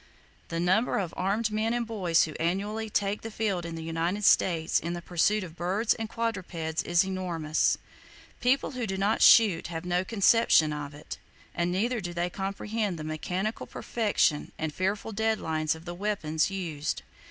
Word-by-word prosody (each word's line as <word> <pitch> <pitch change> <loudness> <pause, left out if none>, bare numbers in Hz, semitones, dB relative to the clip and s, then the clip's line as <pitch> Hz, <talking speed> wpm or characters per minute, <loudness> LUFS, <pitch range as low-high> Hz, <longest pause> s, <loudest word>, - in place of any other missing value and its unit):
The 165 - -3
number 185 +7 +2
of 180 -4 -2
armed 210 +4 0
men 220 +2 0
and 240 -1 -1
boys 185 -7 +2
who 155 - -3
annually 205 +6 -1
take 205 0 0
the 225 - -6
field 200 -6 -2
in 165 - -6
the 165 - -6
United 165 +5 -2
States 165 -4 +3
in 170 +1 -4
the 175 - -5
pursuit 195 +5 +1
of 165 -3 -9
birds 190 +6 +1
and 225 -1 -5
quadrupeds, 185 -9 -2
is 175 +2 +2
enormous. 175 -5 0
[Page - - -24 0.5
59] - - -30
People - - -6
who 250 -4 -3
do 190 0 -2
not 200 +3 +1
shoot 205 -8 +6
have 165 0 -5
no 180 +1 +1
conception 200 -6 +4
of 145 -1 -6
it; 150 - -8 0.3
and 170 +1 0
neither 225 +6 0
do 175 -1 -5
they 175 +1 -1
comprehend 200 0 -2
the 155 - -6
mechanical 180 +7 -3
perfection 205 -9 0
and 155 -1 -3
fearful 200 +5 -2
deadliness 180 -8 0
of 160 +1 -13
the 175 - -5
weapons 175 -5 0
used. 165 -6 -3
185 Hz, 180 wpm, -28 LUFS, 165-215 Hz, 0.5 s, shoot